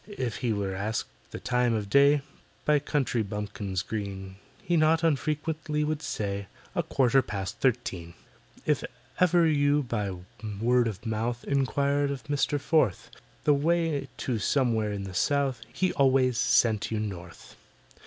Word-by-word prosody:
If 130 - -4
he 120 -3 -1
were 100 -2 -1
asked 105 +4 -2 0.2
the - - -7
time 125 -1 +1
of 105 -2 -2
day, 140 +5 +5 0.4
By 150 -1 +4
country 135 -5 0
bumpkins 100 -3 -3
green, 95 -3 -5 0.3
He 175 - +1
not 160 +1 +3
unfrequently 150 0 0
would 155 0 -1
say, 100 -5 -3 0.3
"A - - +1
quarter 135 0 +3
past 100 -2 -5
thirteen." 90 -9 -1 0.5
If - - +1 0.4
ever 175 -1 +5
you 145 -1 +3
by 105 -6 -3 0.4
word 120 +1 +3
of 110 0 -6
mouth 115 +2 -2
Inquired 140 +1 +1
of 140 0 -5
MISTER 145 0 +1
FORTH 140 - +1 0.3
The 150 - +5
way 155 -1 +1
to 120 -4 -2
somewhere 115 -3 +1
in 100 -1 -4
the 95 -1 -7
South, 135 +3 +1
He 185 +7 0
always 130 -2 +3
sent 110 -5 +3
you 110 - -1
North. 90 -5 -7
125 Hz, 145 wpm, -28 LUFS, 105-145 Hz, 0.5 s, day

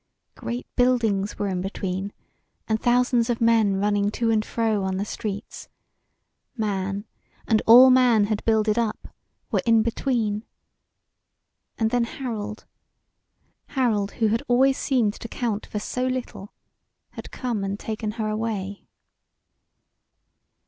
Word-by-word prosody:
Great 240 +1 -5
buildings 225 -6 +1
were 205 - -1
in 185 -2 -2
between, 195 0 -4 0.6
and 220 -1 0
thousands 245 -1 +2
of 235 - 0
men 225 -4 +3
running 205 +1 +1
to 225 +2 0
and 215 -1 +2
fro 220 -3 -1
on 190 0 -1
the 200 - -2
streets; 210 0 -6 0.9
man, 200 -1 -2 0.4
and 220 -1 +3
all 250 +3 +9
man 250 -4 +5
had 210 0 -1
builded 220 0 +2
up, 225 -2 -3 0.4
were - - +1
in 225 -2 +4
between. 225 -3 -1 1.3
And 220 -2 0
then 245 -1 +2
Harold 220 -4 -6 1.1
Harold 210 -6 +1
who 220 -2 +1
had 225 +2 +1
always 265 +2 +3
seemed 240 -7 +1
to - - -7
count 225 -3 -3
for - - -5
so 250 +4 -2
little, 255 -6 -5 0.6
had - - -9
come 235 -6 -3
and 195 +1 -3
taken 215 -1 -4
her 220 -1 -3
away. 215 -2 -4
220 Hz, 130 wpm, -24 LUFS, 205-235 Hz, 1.3 s, all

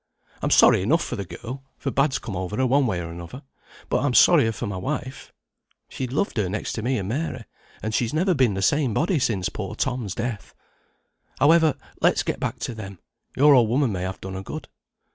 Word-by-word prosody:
I'm - - 0
sorry - - +6
enough - - +2
for - - -4
the 100 - -5
girl, 125 +9 -8 0.2
for 135 - -3
bad's 140 +1 +2
come 105 - -6
over 95 +3 -4
her, 130 - +2
one 135 +1 +3
way 95 -6 -1
or 85 -1 -6
another, 85 - -9 0.4
but - - +1
I'm 135 -4 +1
sorrier 145 -10 +6
for 110 - -5
my 100 -2 -4
wife. 130 +5 -5 0.6
She 130 - -4
loved 140 +5 -2
her 100 -4 0
next 105 +3 -3
to 110 - -3
me 130 +4 0
and 95 -3 -3
Mary, 130 -1 -3 0.4
and 110 0 -2
she's 115 0 0
never 180 +5 +2
been 130 - +2
the 95 - -2
same 140 -5 +2
body 165 0 +1
since 100 -7 0
poor 105 0 -6
Tom's 120 -6 -2
death. 115 -3 -5 0.8
However, 160 +2 +4 0.3
let's - - +3
go - - -1
back - - -3
to 125 - -3
them; 100 -4 -8 0.4
your 145 +2 +7
old 120 -5 +5
woman 130 0 +2
may 90 -3 -3
have 95 +1 -4
done 95 0 -7
her 95 - -5
good." 95 - -7
120 Hz, 215 wpm, -24 LUFS, 100-140 Hz, 0.8 s, your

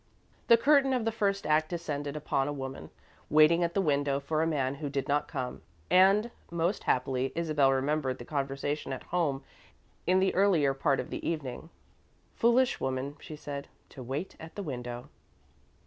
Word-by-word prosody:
The 235 - +8
curtain 275 +2 +4
of 245 -3 0
the 225 - +1
first 200 -4 0
act 155 +1 +2
descended 150 -4 -4
upon 140 -2 -1
a - - -1
woman, 135 - -6 0.4
waiting 155 +3 +5
at 170 0 -1
the 195 - +3
window 140 -3 +1
for 155 +3 -1
a 165 - +2
man 140 -4 0
who 145 - -2
did 140 -1 -2
not 145 +1 +1
come, 130 -2 -5 0.3
and, 195 +5 +5 0.2
most 170 +3 -1
happily, 130 +1 0
Isabel 155 -5 +2
remembered 135 0 0
the 120 - -9
conversation 140 0 -2
at 130 - -6
home 155 -6 -1 0.6
in 185 +1 +4
the 190 0 +2
earlier 175 -8 +3
part 135 0 +1
of - - -5
the - - -5
evening. 155 -2 -5 0.6
"Foolish 245 +2 +3
woman," 130 +2 -2
she 155 - -9
said, 140 -1 -6 0.2
"to 130 - -11
wait 135 +9 -4
at 160 0 -10
the 205 - -4
window." 125 -5 -6
150 Hz, 175 wpm, -30 LUFS, 135-175 Hz, 0.6 s, The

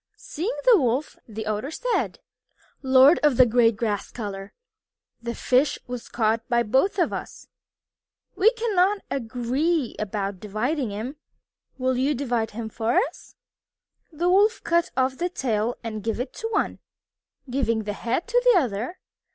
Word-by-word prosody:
Seeing 385 +11 -4
the 480 -5 +7
Wolf, 255 +4 0
the 220 -1 -6
Otters 215 +8 -3
said: - - -1 0.6
"Lord 265 +4 +6
of 295 -5 +3
the 255 - +8
gray 230 0 +4
grass 210 -2 -2
color, 200 -3 -6 0.7
this 235 0 -5
fish 260 +4 +2
was 245 -1 -7
caught 225 -1 +1
by 240 -1 +3
both 265 - +1
of 350 - +1
us - - -6
together. - - -22 0.8
We 425 +3 +5
cannot 415 -4 +1
agree 260 +4 -1
about 200 -2 -3
dividing 235 - -2
him. 225 +8 -5 0.6
Will 255 -1 0
you 275 +3 +1
divide 240 -4 -1
him 225 +1 -6
for 225 +2 -1
us?" 320 - -2 0.8
The 335 +3 -1
Wolf 405 +5 +3
cut 340 0 +2
off 260 0 +1
the 355 +1 0
tail 235 - -1
and 215 -2 -5
gave 225 +1 -2
it 250 +1 -4
to 450 - -4
one, 455 - -1 0.7
giving 230 -4 0
the 205 0 -3
head 235 - -2
to - - +3
the - - +6
other. 245 - -3
250 Hz, 155 wpm, -24 LUFS, 225-315 Hz, 0.8 s, the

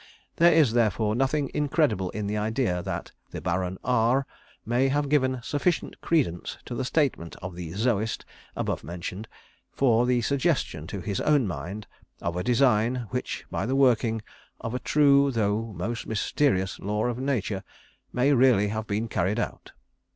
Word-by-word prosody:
There 170 +1 +6
is, 155 -8 +4
therefore, 110 -2 +2
nothing 135 +4 0
incredible 145 - +1
in 105 +2 -4
the 105 +1 -2
idea 105 -3 0
that - - -5 0.2
the - - -6
Baron 90 +1 -2
R 125 +2 +2 0.4
may 120 +4 +2
have 145 +1 0
given 130 -3 +2
sufficient 155 +6 -1
credence 130 - 0
to - - -6
the 120 - -2
statement 130 - 0
of 95 0 -7
the 85 -2 -7
'Zoist,' 110 +1 0 0.3
above - - -2
mentioned, 90 +7 -6 0.4
for 120 -2 +3
the 125 -1 +2
suggestion 140 - 0
to 100 0 -5
his 100 +1 -2
own 145 -5 +3
mind 95 +3 -5 0.3
of 85 0 -3
a 90 - -2
design, 120 0 +2
which 125 - -3
by 105 - -2
the 130 - 0
working 115 -4 +3 0.4
of 115 - -5
a 125 - -1
true, 140 -1 +4
though 110 -2 0
most 115 +7 -3
mysterious, 100 -3 0
law 105 +2 -1
of 120 0 -2
Nature, 110 -8 -1 0.5
may 130 +4 +3
really 120 -6 +4
have 110 +1 -3
been 110 +2 -1
carried 100 0 0
out. - - -4
115 Hz, 160 wpm, -26 LUFS, 100-135 Hz, 0.5 s, There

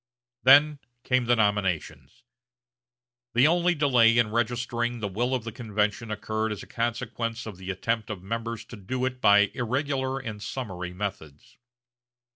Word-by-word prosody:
Then 145 +3 +6 0.2
came 130 -1 +1
the 120 +1 +4
nominations. 105 - -1 1.1
The 125 +3 +6
only 175 +2 +3
delay 125 -6 +4
in 115 -3 +3
registering 120 +1 -1
the 105 - -2
will 120 +7 -1
of 125 - -3
the 115 - -5
convention 105 0 -2
occurred 110 +1 -2
as 105 -2 -5
a - - -10
consequence 115 0 -3
of 105 -5 -8
the 95 +1 -8
attempt 110 +4 -2
of 100 -4 -6
members 115 +2 -4
to - - -10
do 125 +6 -3
it 130 -1 -4
by 100 0 +5
irregular 130 +2 -1
and 110 -6 -6
summary 100 -5 -5
methods. 90 -6 -7
115 Hz, 150 wpm, -26 LUFS, 105-125 Hz, 1.1 s, Then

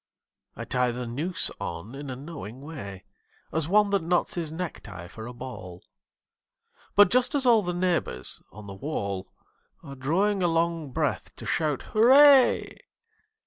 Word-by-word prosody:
I - - -6
tie 125 -1 +1
the 125 +1 -4
noose 155 +9 -1
on 85 +8 -6
in 140 0 -7
a 130 - -4
knowing 135 -4 -8
way 115 - -8 0.5
As 160 -1 0
one 205 +2 +3
that 200 -2 +2
knots 170 +2 0
his 165 -3 -3
necktie 110 - -6
for 110 +5 -9
a - - -6
ball; 120 -8 -9 1.1
But 205 -2 +7
just 255 +3 +2
as 275 -2 +1
all 235 -3 +6
the 180 -2 -2
neighbours 175 - -1
on 105 +2 -11
the 100 - -8
wall 100 -6 -4 0.5
Are 140 - -9
drawing 185 +10 0
a 175 - +3
long 165 -2 0
breath 145 -6 -2
to - - -9
shout 150 -3 0
'Hurray!' 265 +4 +6
155 Hz, 155 wpm, -26 LUFS, 120-180 Hz, 1.1 s, But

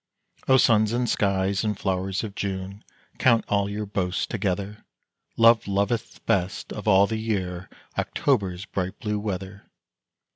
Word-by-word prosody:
O 130 - +6
suns 110 -3 +4
and 120 0 0
skies 100 -1 +1
and 105 -2 -1
flowers 95 +1 -1
of 105 -3 -5
June, 100 0 -4 0.4
Count 115 -3 +4
all 100 -1 +1
your 105 +1 -3
boasts 95 -2 -1
together, 100 -1 -3 0.5
Love 115 -1 +5
loveth 100 +4 -1
best 95 -1 -1
of 105 - -7
all 100 -1 +6
the 110 +1 -3
year 95 -5 -3 0.3
October's 100 -8 0
bright 95 -2 -3
blue 105 -1 -2
weather. 100 -1 -5
100 Hz, 140 wpm, -25 LUFS, 95-110 Hz, 0.5 s, O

